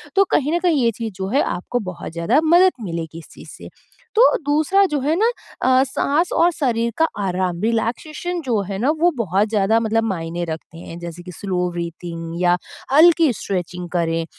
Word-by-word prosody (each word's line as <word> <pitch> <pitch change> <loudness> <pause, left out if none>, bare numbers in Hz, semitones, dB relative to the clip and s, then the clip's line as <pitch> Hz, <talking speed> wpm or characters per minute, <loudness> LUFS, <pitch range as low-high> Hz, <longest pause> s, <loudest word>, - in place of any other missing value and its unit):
तो 395 - +6
कहीं 300 +2 +2
न 345 - +2
कहीं 335 -7 +2
ये 230 - +3
चीज़ 225 -3 -4
जो 190 0 -4
है 275 +7 +2
आपको 245 +7 -2
बहुत 185 -3 -6
ज़्यादा 170 - +2
मदद 350 +4 +6
मिलेगी 165 -3 -5
इस 165 - -14
चीज़ - - -13
से। - - -11 0.5
तो 455 - +6 0.2
दूसरा 310 +7 +3
जो 295 - 0
है 300 +4 +1
ना 450 +2 +4 0.3
अ, 260 0 +4
साँस 295 +5 0
और 345 +1 +4
शरीर 235 -5 0
का 325 - +3
आराम, 185 -2 -1
रिलैक्सेशन 245 - -2
जो 240 -8 0
है 195 - -3
ना 255 +6 +1
वो 350 +2 +4
बहुत 200 -1 +1
ज़्यादा 215 +1 +2
मतलब 225 0 0
मायने 175 -4 -3
रखते 160 +1 -7
हैं 165 0 -9
जैसे 170 0 -8
कि 180 - -9
स्लो 180 0 -2
ब्रीथिंग 170 0 -6
या 175 0 +3 0.4
हल्की 325 0 +6
स्ट्रेचिंग 180 -3 -4
करें 165 -1 0
220 Hz, 190 wpm, -20 LUFS, 175-295 Hz, 0.5 s, तो